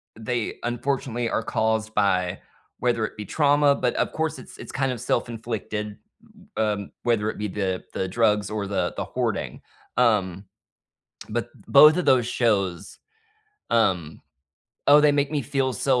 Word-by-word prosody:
they 115 +1 -3
unfortunately 120 -1 -2
are 115 - -1
caused 110 0 -1
by 95 -2 +1 0.4
whether 120 -3 +1
it - - -9
be 105 - -6
trauma, 145 +2 +3
but 125 -2 -1
of - - 0
course 160 0 -2
it's - - -13
it's - - -9
kind 135 -2 0
of 120 -2 -5
self-inflicted, 110 -3 -3 0.6
um, 105 -2 -1
whether 110 -3 +1
it - - -9
be 105 0 -2
the 95 -2 -2
the 95 - -1
drugs 105 0 +2
or 105 -2 -3
the 100 0 -1
the - - -2
hoarding, - - -3 0.4
um, 105 -6 +2 0.8
but, - - -2 0.2
both 155 +1 +8
of 180 - 0
those 125 -3 +4
shows, 100 -6 -1 0.7
um 95 -9 +1 0.7
oh, 145 +1 +8
they 150 -1 +5
make 145 -1 +1
me 150 -2 0
feel 135 -1 -1
so, 130 0 +1
115 Hz, 155 wpm, -24 LUFS, 105-130 Hz, 0.8 s, both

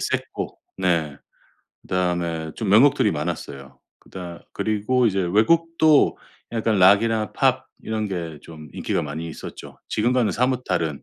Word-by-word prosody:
셌고 - - -3 0.2
네 85 -6 0 0.7
그다음에 85 -3 -2
좀 110 - -3
명곡들이 115 +2 +5
많았어요. 75 -4 -6 0.2
그다 90 -2 -10
그리고 110 +4 +1
이제 95 -2 -2
외국도 155 - +3 0.4
약간 110 -3 0
락이나 105 +4 +4
팝 130 0 +1 0.2
이런 110 -1 -2
게 85 -5 -5
좀 75 -2 -11
인기가 - - -1
많이 75 +3 -5
있었죠. 80 - -10
지금과는 120 +1 +1
사뭇 125 +1 0
다른 80 -6 -2
100 Hz, 285 characters per minute, -23 LUFS, 85-115 Hz, 0.7 s, 명곡들이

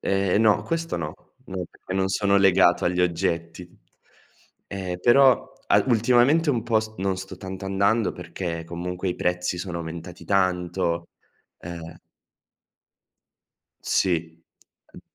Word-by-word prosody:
Ehm, 95 +1 +1
no. 110 -2 +4
Questo 165 - -2
no. 80 -2 -4 0.3
No, 95 -1 -4
perché 95 - -8
non 95 0 +1
sono 100 +1 +2
legato 95 -2 +4
agli 90 0 +1
oggetti. 85 0 -1 1.0
Ehm, 95 -2 -4
però, 130 +4 +5 0.2
al - - +4
ultimamente 125 +7 +4
un 120 -5 0
po' 115 -1 +2
s 110 0 -8
non 95 0 0
sto 95 0 -8
tanto 95 +1 -7
andando, 100 +3 +1
perché 85 -1 -5
comunque, 90 +2 -4
i 90 - -1
prezzi 90 0 -1
sono 90 -1 -4
aumentati 85 +1 -8
tanto, 90 -2 0 0.5
ehm 85 -1 -9 1.9
Sì. 85 -2 0 0.5
Uhm - - -12
95 Hz, 125 wpm, -24 LUFS, 85-100 Hz, 1.9 s, però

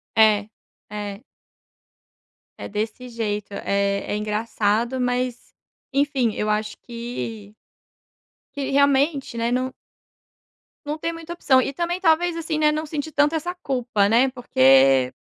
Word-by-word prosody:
É, 215 -1 +4 0.4
é. 205 0 -6 1.4
É - - -6
desse 220 +4 -4
jeito, 210 -3 -3
eh, 200 0 0
é - - 0
engraçado, 215 +3 0
mas 250 0 -2 0.4
enfim, 275 -5 +1
eu 210 - -1
acho 215 0 -1
que 230 -3 -7 1.0
que 280 -1 -2
realmente, 280 -1 +2
né, 230 +1 0
não 255 +1 -1 1.1
não 300 +1 -3
tem 330 +2 -3
muita 330 +1 -7
opção 265 -6 +3
e 275 - -3
também, 345 +4 -2
talvez, 335 0 +3
assim, 325 -1 -2
né, 305 0 +4
não 310 +1 -2
sentir 305 0 -4
tanto 295 +2 +2
essa 350 +3 -2
culpa, 245 - 0
né, 240 +5 +4
porque 135 - +4
245 Hz, 130 wpm, -23 LUFS, 210-290 Hz, 1.4 s, É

